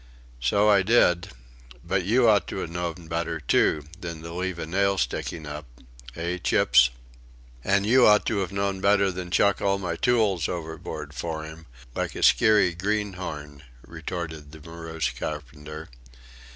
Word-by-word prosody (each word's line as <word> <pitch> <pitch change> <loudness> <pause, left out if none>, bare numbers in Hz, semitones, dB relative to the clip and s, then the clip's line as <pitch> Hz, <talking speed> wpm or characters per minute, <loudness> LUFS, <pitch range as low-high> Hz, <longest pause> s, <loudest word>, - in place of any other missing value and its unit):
So 100 - +2
I 100 -2 +5
did, 95 -4 +3 0.5
but 95 - 0
you 120 +6 +3
ought 105 -2 +4
to - - -5
have 80 - -5
known 85 -1 -4
better, 85 0 -2
too, 75 0 +2 0.2
than 85 -3 -7
to 85 0 -7
leave 90 0 -3
a - - -4
nail 100 +4 +1
sticking 80 +3 -3
up 75 -1 -7 0.5
hey, 85 +2 -3
Chips?" 60 -7 +4 0.7
"And 100 +1 +2
you 125 +3 +6
ought 105 -1 +5
to 110 - 0
have 95 -1 -2
known 100 -1 -2
better 100 -1 +3
than 90 -1 -6
to 90 - +2
chuck 100 -1 +2
all 100 0 +2
my 90 -3 -3
tools 105 -6 +1
overboard 80 -2 -6
for 80 -2 -4
'im, 80 +1 -11 0.3
like - - -3
a - - -4
skeary 105 -5 +5
greenhorn," 90 -7 -4 0.2
retorted 80 -2 -6
the 80 - -12
morose 80 -1 -4
carpenter. 75 +1 -7
85 Hz, 160 wpm, -25 LUFS, 80-100 Hz, 0.7 s, you